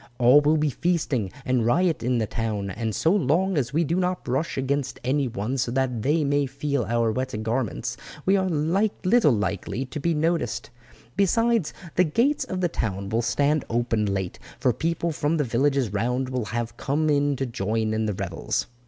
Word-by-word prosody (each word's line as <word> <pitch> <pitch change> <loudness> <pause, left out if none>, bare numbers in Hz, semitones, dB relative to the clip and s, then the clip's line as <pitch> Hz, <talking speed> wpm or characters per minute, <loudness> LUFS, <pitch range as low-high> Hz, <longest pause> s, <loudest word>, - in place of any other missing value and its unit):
All 125 +4 +6
will 150 +2 +3
be 150 -1 +1
feasting 145 - 0
and 125 -2 +2
riot 165 +8 +2
in 125 +1 +1
the 110 - +1
town, 105 -3 -3
and 110 +2 -3
so 160 - +2
long 185 +1 +2
as 135 -5 0
we 160 +4 +2
do 165 +3 0
not 180 0 0
brush 135 +6 -2
against 135 0 -1
any 135 +2 +1
one 120 +4 -3
so 120 - 0
that 125 -2 0
they 150 +7 +2
may 145 0 +1
feel 140 -1 -2
our 115 +1 +1
wet 130 +1 -3
garments 115 -1 -2 0.3
we 195 - +4
are 190 -1 +1
little 185 - +2
likely 105 +2 -2
to 135 +4 -6
be 165 +3 0
noticed; 165 +3 -1 0.4
besides, 230 -1 +2 0.3
the 180 - +6
gates 235 - +1
of 185 -1 -4
the 175 - +3
town 100 - -3
will 115 +2 +1
stand 145 +4 +1
open 115 -2 0
late, 95 -2 -3 0.2
for 125 - +2
people 165 +3 -1
from 150 +1 0
the 150 - +2
villages 130 -2 +1
round 125 +5 0
will 125 -3 -2
have 120 +1 -4
come 150 +3 0
in 145 -1 +2
to 135 - -2
join 110 -1 -1
in 110 0 0
the 105 - -1
revels." 90 -3 -2
135 Hz, 190 wpm, -25 LUFS, 115-160 Hz, 0.4 s, All